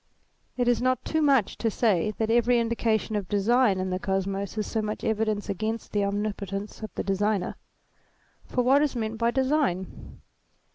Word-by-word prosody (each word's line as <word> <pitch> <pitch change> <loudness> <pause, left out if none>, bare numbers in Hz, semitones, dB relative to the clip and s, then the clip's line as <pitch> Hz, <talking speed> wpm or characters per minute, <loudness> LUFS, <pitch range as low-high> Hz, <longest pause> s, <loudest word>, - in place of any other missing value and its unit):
It 245 -1 +1
is 245 -1 +3
not 255 -1 +1
too 315 - 0
much 275 -8 +2
to 230 - +1
say 215 -4 +1
that 220 0 0
every 240 +1 +4
indication 225 -2 0
of 200 -3 -3
Design 210 0 +3
in 185 0 -2
the 185 - -1
Kosmos 195 +1 -2
is 215 - -1
so 220 - -2
much 215 0 -4
evidence 215 -1 0
against 215 +3 -3
the 205 -1 +1
Omnipotence 200 0 -3
of 215 -3 -6
the - - -2
Designer. 195 -1 0 0.9
For 250 - -1
what 270 +3 +5
is 295 -3 0
meant 220 -1 -3
by 230 0 +3
Design 265 - -1
220 Hz, 175 wpm, -26 LUFS, 200-240 Hz, 0.9 s, what